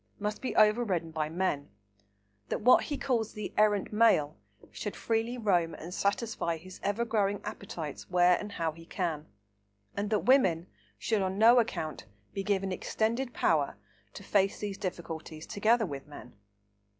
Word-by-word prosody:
must 210 Hz, 0 st, -3 dB
be 260 Hz, -, -3 dB
overridden 210 Hz, -6 st, +3 dB
by 155 Hz, -1 st, -2 dB
men; 165 Hz, -4 st, -1 dB, 0.8 s
that -, -, -2 dB
what 250 Hz, +3 st, +6 dB
he 290 Hz, -, -3 dB
calls 235 Hz, -6 st, -1 dB
the 210 Hz, -1 st, -6 dB
"errant 210 Hz, -1 st, +2 dB
male" 210 Hz, -10 st, +4 dB, 0.4 s
should 210 Hz, -, -5 dB
freely 230 Hz, +2 st, -1 dB
roam 180 Hz, -7 st, +1 dB
and 170 Hz, +3 st, -8 dB
satisfy 200 Hz, -4 st, -1 dB
his 185 Hz, +3 st, -12 dB
ever 205 Hz, +4 st, 0 dB
growing 205 Hz, -3 st, +1 dB
appetites 180 Hz, -8 st, -6 dB
where 180 Hz, 0 st, +5 dB
and 205 Hz, -1 st, -7 dB
how 165 Hz, -3 st, -1 dB
he 165 Hz, +2 st, -13 dB
can; 165 Hz, -3 st, -3 dB, 0.7 s
and 200 Hz, +1 st, -2 dB
that 215 Hz, -2 st, 0 dB
women 185 Hz, -11 st, +4 dB, 0.3 s
should 210 Hz, -, 0 dB
on 190 Hz, 0 st, -1 dB
no 235 Hz, +3 st, +7 dB
account 160 Hz, -, -3 dB, 0.3 s
be 195 Hz, -, -2 dB
given 195 Hz, -1 st, 0 dB
"extended 230 Hz, +7 st, -1 dB
power" 150 Hz, -, +1 dB, 0.3 s
to -, -, -10 dB
face 195 Hz, 0 st, +2 dB
these 205 Hz, -2 st, -5 dB
difficulties 165 Hz, -4 st, -6 dB
together 220 Hz, +3 st, +2 dB
with 140 Hz, -4 st, -7 dB
men. 135 Hz, -4 st, -11 dB
200 Hz, 155 wpm, -30 LUFS, 165-220 Hz, 0.8 s, no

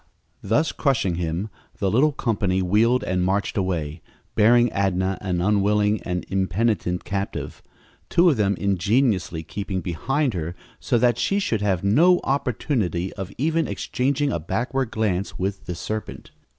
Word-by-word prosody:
Thus 130 Hz, +11 st, +1 dB
crushing 125 Hz, -, +1 dB
him, 85 Hz, +4 st, -3 dB, 0.3 s
the 95 Hz, -2 st, 0 dB
little 145 Hz, +7 st, +4 dB
company 100 Hz, -8 st, 0 dB
wheeled 115 Hz, +7 st, +3 dB
and 90 Hz, 0 st, 0 dB
marched 95 Hz, +2 st, 0 dB
away, 85 Hz, -5 st, -2 dB, 0.3 s
bearing 120 Hz, +2 st, +4 dB
Adnah 95 Hz, -1 st, 0 dB
an 90 Hz, -3 st, -1 dB
unwilling 105 Hz, +1 st, +2 dB
and 90 Hz, -1 st, -3 dB
impenitent 95 Hz, -1 st, 0 dB
captive, 100 Hz, 0 st, -4 dB, 0.5 s
two 175 Hz, +1 st, +4 dB
of 160 Hz, -, +5 dB
them 100 Hz, -3 st, +1 dB
ingeniously 100 Hz, -2 st, +1 dB
keeping 100 Hz, +2 st, -4 dB
behind 130 Hz, -, -1 dB
her 85 Hz, -1 st, -4 dB, 0.2 s
so 120 Hz, -, +1 dB
that 120 Hz, 0 st, +2 dB
she 195 Hz, -, +1 dB
should 115 Hz, -, 0 dB
have 95 Hz, -4 st, 0 dB
no 170 Hz, -, +5 dB
opportunity 120 Hz, -, -1 dB
of 95 Hz, 0 st, -6 dB
even 160 Hz, +4 st, +1 dB
exchanging 140 Hz, +2 st, -1 dB
a 85 Hz, -, -1 dB
backward 125 Hz, -, -2 dB
glance 100 Hz, -4 st, -1 dB
with 95 Hz, +1 st, -3 dB
the 90 Hz, -, -3 dB
serpent. 110 Hz, +5 st, -6 dB
100 Hz, 145 wpm, -23 LUFS, 90-120 Hz, 0.5 s, of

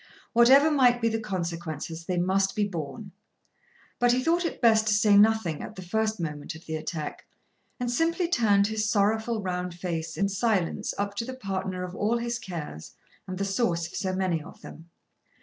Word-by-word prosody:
Whatever 265 Hz, +6 st, +6 dB
might 250 Hz, -4 st, +4 dB
be 230 Hz, -1 st, +2 dB
the 225 Hz, 0 st, -1 dB
consequences, 170 Hz, -5 st, -4 dB
they 180 Hz, 0 st, -2 dB
must 190 Hz, +2 st, +1 dB
be 210 Hz, -1 st, +1 dB
borne. 190 Hz, +4 st, -6 dB, 0.9 s
But 245 Hz, 0 st, +4 dB
he 255 Hz, +1 st, +1 dB
thought 340 Hz, +3 st, +2 dB
it -, -, -3 dB
best 220 Hz, -2 st, +4 dB
to 210 Hz, -, +4 dB
say 210 Hz, -1 st, +4 dB
nothing 210 Hz, -6 st, +4 dB
at 215 Hz, -, -8 dB
the 185 Hz, -, -8 dB
first 220 Hz, +4 st, -1 dB
moment 150 Hz, -1 st, -5 dB
of 160 Hz, -, -13 dB
the 160 Hz, -, -4 dB
attack, 155 Hz, -1 st, -5 dB, 0.5 s
and 245 Hz, -1 st, -1 dB
simply 335 Hz, +6 st, +1 dB
turned 215 Hz, -, +3 dB
his 215 Hz, 0 st, -1 dB
sorrowful 220 Hz, +2 st, +1 dB
round 180 Hz, -1 st, -3 dB
face 165 Hz, -2 st, -4 dB
in 200 Hz, -, +2 dB
silence 200 Hz, -1 st, 0 dB
up 200 Hz, 0 st, -2 dB
to 230 Hz, -, -1 dB
the 260 Hz, +1 st, -6 dB
partner 190 Hz, -5 st, -3 dB
of 180 Hz, 0 st, -6 dB
all 215 Hz, +5 st, 0 dB
his 235 Hz, 0 st, -3 dB
cares 150 Hz, -, -7 dB, 0.3 s
and 185 Hz, 0 st, -5 dB
the 200 Hz, -, -1 dB
source 195 Hz, -5 st, 0 dB
of 175 Hz, -, -9 dB
so 190 Hz, -, -2 dB
many 185 Hz, -4 st, 0 dB
of 170 Hz, -, -13 dB
them. 165 Hz, +2 st, -11 dB
200 Hz, 190 wpm, -27 LUFS, 175-230 Hz, 0.9 s, Whatever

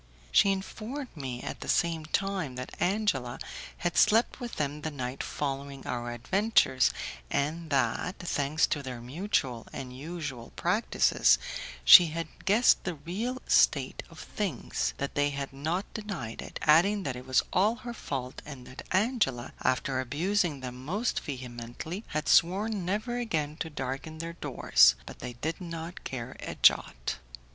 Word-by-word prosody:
She 200 Hz, -, +6 dB
informed 225 Hz, +7 st, -5 dB
me 130 Hz, -4 st, -5 dB
at -, -, -5 dB
the -, -, -7 dB
same 165 Hz, -2 st, +1 dB
time 190 Hz, -7 st, -1 dB
that 125 Hz, +1 st, -6 dB
Angela 175 Hz, -, 0 dB, 0.4 s
had 175 Hz, -1 st, -2 dB
slept 225 Hz, +4 st, +4 dB
with 240 Hz, -2 st, -6 dB
them 150 Hz, 0 st, -2 dB
the 155 Hz, -, -2 dB
night 130 Hz, -3 st, -4 dB
following 140 Hz, -1 st, -4 dB
our 120 Hz, -1 st, -3 dB
adventures, 130 Hz, -, +3 dB, 0.4 s
and 160 Hz, +3 st, -1 dB
that, 135 Hz, +6 st, 0 dB
thanks 155 Hz, -3 st, +1 dB
to 150 Hz, -, -1 dB
their 130 Hz, -3 st, -6 dB
mutual 130 Hz, -, -2 dB
and 125 Hz, -2 st, -7 dB
usual 140 Hz, -5 st, -6 dB
practices, -, -, +3 dB, 0.5 s
she 170 Hz, -, +11 dB
had 165 Hz, 0 st, -6 dB
guessed 220 Hz, +5 st, +5 dB
the 175 Hz, -3 st, -3 dB
real 220 Hz, -, -4 dB
state -, -, +3 dB
of -, -, -13 dB
things, 190 Hz, -, -2 dB
that 140 Hz, -, -3 dB
they 145 Hz, 0 st, +2 dB
had 140 Hz, -1 st, -4 dB
not 160 Hz, +8 st, -2 dB
denied 195 Hz, -, -5 dB
it, -, -, -7 dB
adding 185 Hz, +7 st, +5 dB
that 135 Hz, -7 st, -2 dB
it 125 Hz, +1 st, -9 dB
was 130 Hz, -, +3 dB
all 210 Hz, +5 st, +3 dB
her 240 Hz, -, -4 dB
fault, 130 Hz, -, -5 dB
and 140 Hz, -4 st, -9 dB
that 130 Hz, -, -9 dB
Angela, 190 Hz, -, +1 dB
after 130 Hz, +1 st, +1 dB
abusing 155 Hz, +3 st, 0 dB
them 125 Hz, 0 st, -7 dB
most 205 Hz, -, -1 dB
vehemently, 125 Hz, -, -6 dB
had 155 Hz, 0 st, -3 dB
sworn 195 Hz, +3 st, +3 dB
never 215 Hz, +6 st, -1 dB
again 155 Hz, -11 st, -1 dB
to 160 Hz, -, -3 dB
darken 135 Hz, +2 st, -5 dB
their 165 Hz, +1 st, -5 dB
doors; 60 Hz, -, +4 dB
but -, -, -10 dB
they 125 Hz, 0 st, -6 dB
did 160 Hz, +9 st, -4 dB
not 165 Hz, 0 st, -6 dB
care 125 Hz, -1 st, -5 dB
a -, -, -5 dB
jot. -, -, +3 dB
150 Hz, 155 wpm, -29 LUFS, 130-190 Hz, 0.5 s, she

